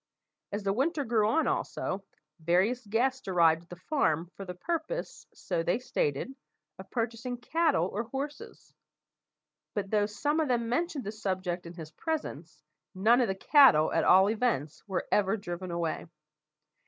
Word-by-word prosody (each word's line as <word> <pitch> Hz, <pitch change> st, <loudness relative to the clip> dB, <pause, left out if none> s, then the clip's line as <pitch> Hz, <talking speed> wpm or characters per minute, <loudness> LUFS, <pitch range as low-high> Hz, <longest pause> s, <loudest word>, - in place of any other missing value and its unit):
As 205 Hz, +1 st, -3 dB
the 195 Hz, 0 st, +1 dB
winter 290 Hz, -, 0 dB
grew 220 Hz, -3 st, +2 dB
on, 320 Hz, +6 st, +2 dB
also, 195 Hz, +1 st, -2 dB, 0.4 s
various 185 Hz, +10 st, +2 dB
guests 255 Hz, +4 st, 0 dB
arrived 165 Hz, -3 st, +4 dB
at 175 Hz, -, -23 dB
the 175 Hz, -, -8 dB
farm 175 Hz, -, 0 dB
for 195 Hz, -, -7 dB
the 180 Hz, -1 st, -6 dB
purpose, 335 Hz, -, -4 dB
so 175 Hz, -3 st, -3 dB
they 175 Hz, +5 st, +1 dB
stated, 235 Hz, -, -2 dB, 0.5 s
of 190 Hz, -, -10 dB
purchasing 235 Hz, +1 st, -3 dB
cattle 305 Hz, -, +1 dB
or 210 Hz, +5 st, -3 dB
horses; 290 Hz, -, -7 dB, 1.0 s
but 200 Hz, -2 st, -3 dB
though 210 Hz, -1 st, +2 dB
some 290 Hz, +9 st, -1 dB
of 315 Hz, -, +1 dB
them 240 Hz, -2 st, 0 dB
mentioned 310 Hz, +1 st, -1 dB
the 205 Hz, -, -4 dB
subject 185 Hz, -4 st, -3 dB
in 170 Hz, -, -10 dB
his 160 Hz, -3 st, -9 dB
presence, 160 Hz, -, -5 dB, 0.3 s
none 225 Hz, +7 st, +4 dB
of 240 Hz, -, +2 dB
the 190 Hz, -, -1 dB
cattle, 225 Hz, -, +6 dB
at -, -, +2 dB
all 190 Hz, +2 st, +6 dB
events, 215 Hz, -, -1 dB
were 190 Hz, -2 st, -2 dB
ever 205 Hz, +1 st, +2 dB
driven 180 Hz, -2 st, -6 dB
away. 170 Hz, -1 st, -2 dB
210 Hz, 160 wpm, -29 LUFS, 175-255 Hz, 1.0 s, cattle